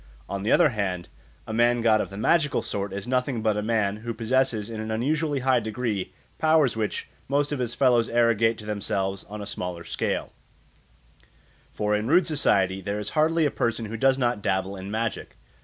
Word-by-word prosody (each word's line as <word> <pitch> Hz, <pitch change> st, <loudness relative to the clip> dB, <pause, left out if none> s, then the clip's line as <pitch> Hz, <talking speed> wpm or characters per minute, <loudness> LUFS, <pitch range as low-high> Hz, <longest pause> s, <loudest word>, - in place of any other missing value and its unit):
On 100 Hz, 0 st, -4 dB
the 105 Hz, -, 0 dB
other 170 Hz, -4 st, +6 dB
hand, 95 Hz, -7 st, -3 dB, 0.4 s
a 110 Hz, -, -6 dB
man 120 Hz, +1 st, +3 dB
god 110 Hz, -2 st, +4 dB
of -, -, -4 dB
the 100 Hz, -, -9 dB
magical 145 Hz, +6 st, +2 dB
sort 100 Hz, -1 st, -3 dB
is 100 Hz, +2 st, -5 dB
nothing 125 Hz, -2 st, 0 dB
but 110 Hz, -2 st, +2 dB
a 105 Hz, -, -1 dB
man 105 Hz, -2 st, 0 dB
who 115 Hz, +1 st, -5 dB
possesses 115 Hz, -2 st, +1 dB
in 110 Hz, -1 st, -5 dB
an 110 Hz, -, -5 dB
unusually 145 Hz, +5 st, 0 dB
high 130 Hz, -1 st, +3 dB
degree 110 Hz, -3 st, -3 dB, 0.3 s
powers 155 Hz, -6 st, +3 dB
which 110 Hz, -2 st, -2 dB, 0.2 s
most 145 Hz, +1 st, +1 dB
of 145 Hz, -, -2 dB
his 120 Hz, -2 st, -2 dB
fellows 120 Hz, -3 st, +3 dB
arrogate 115 Hz, -1 st, +3 dB
to 105 Hz, -, -10 dB
themselves 100 Hz, -2 st, -2 dB
on 105 Hz, 0 st, -7 dB
a -, -, -6 dB
smaller 90 Hz, -3 st, -5 dB
scale; -, -, -2 dB, 1.4 s
for 105 Hz, 0 st, -1 dB
in 105 Hz, +2 st, -1 dB
rude 170 Hz, +5 st, +4 dB
society 95 Hz, -, +2 dB
there 100 Hz, +2 st, -3 dB
is 105 Hz, 0 st, -4 dB
hardly 160 Hz, +1 st, +2 dB
a 145 Hz, -, +1 dB
person 115 Hz, -2 st, -1 dB
who 110 Hz, +1 st, -5 dB
does 135 Hz, +3 st, +3 dB
not 120 Hz, -4 st, 0 dB
dabble 95 Hz, 0 st, -1 dB
in 95 Hz, +1 st, -7 dB
magic. 110 Hz, 0 st, -3 dB
115 Hz, 195 wpm, -25 LUFS, 105-130 Hz, 1.4 s, other